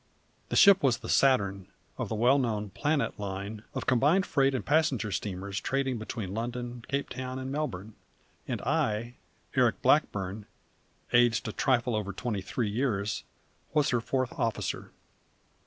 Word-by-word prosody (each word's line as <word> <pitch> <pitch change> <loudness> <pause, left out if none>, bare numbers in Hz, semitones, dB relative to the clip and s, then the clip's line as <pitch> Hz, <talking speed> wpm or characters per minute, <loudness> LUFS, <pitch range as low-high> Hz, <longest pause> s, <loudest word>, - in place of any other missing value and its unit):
The - - -2
ship 200 -2 +7
was 130 -5 +3
the - - -9
Saturn, 100 -8 +3 0.3
of - - -4
the 110 - -2
well 125 +6 +4
known 105 -5 -1
Planet 150 -1 -1
Line 100 +1 -5
of - - -3
combined 145 +9 +3
freight 135 -1 +2
and 130 - -3
passenger 145 -8 +2
steamers 100 0 -3
trading 135 -3 -1
between 110 -3 -5
London, 120 +1 -4
Cape 140 0 -1
Town, 130 0 -5
and 130 0 -5
Melbourne; 110 -9 -3 0.5
and - - -3
I 115 +3 0 0.4
Eric - - +3
Blackburn, 100 +1 +1 0.7
aged 120 -2 +4
a - - -2
trifle 125 -1 +1
over 100 -2 -2
twenty 105 -1 -3
three 105 +3 -2
years 105 -4 -1 0.5
was 150 -2 +3
her 120 -2 +1
fourth 130 +1 -1
officer. 115 -1 -2
120 Hz, 150 wpm, -29 LUFS, 105-135 Hz, 0.7 s, ship